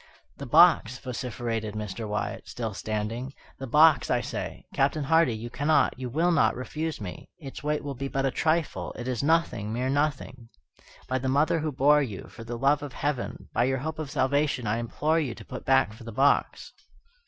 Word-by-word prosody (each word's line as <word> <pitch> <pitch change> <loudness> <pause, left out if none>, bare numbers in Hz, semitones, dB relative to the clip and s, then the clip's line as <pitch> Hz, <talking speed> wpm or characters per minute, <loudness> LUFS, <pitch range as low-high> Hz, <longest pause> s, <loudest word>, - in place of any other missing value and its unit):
"The 140 - -7
box!" 155 -5 +5
vociferated 120 -4 -4
Mr. 105 0 -5
Wyatt, 105 0 -3
still 115 -3 -4
standing, 110 +6 -4 0.2
"the 135 - -5
box, 155 +4 +5
I - - +2
say! - - -5
Captain 140 +2 +1
Hardy, 150 -4 +3
you 115 +2 -7
cannot, 145 +4 +2
you 130 -1 -4
will 165 +8 +2
not 115 -9 +3
refuse 155 +6 -4
me. 95 -5 -8
Its 140 -6 -9
weight 150 +1 -1
will 140 -1 -4
be 135 +1 -4
but 135 0 -1
a 135 - +1
trifle, 160 +2 -1
it 120 - -6
is 125 -3 -1
nothing, 145 -9 +1
mere 125 +3 -1
nothing. 140 -4 -2 0.6
By 130 0 0
the 130 +1 -2
mother 150 +4 +2
who 155 0 -2
bore 145 +2 +4
you 110 -9 -4
for 115 - -11
the 120 +1 -5
love 140 +4 +2
of 145 -3 -7
Heaven 145 -3 -3
by 120 - +2
your 130 +1 +1
hope 155 +4 -4
of 155 -3 -4
salvation, 140 -2 +1
I 110 +2 0
implore 150 +7 0
you 135 -7 -2
to 110 - -12
put - - -8
back 130 -5 +3
for 115 - -13
the 115 - -7
box!" 135 +6 +1
130 Hz, 200 wpm, -27 LUFS, 115-150 Hz, 0.6 s, box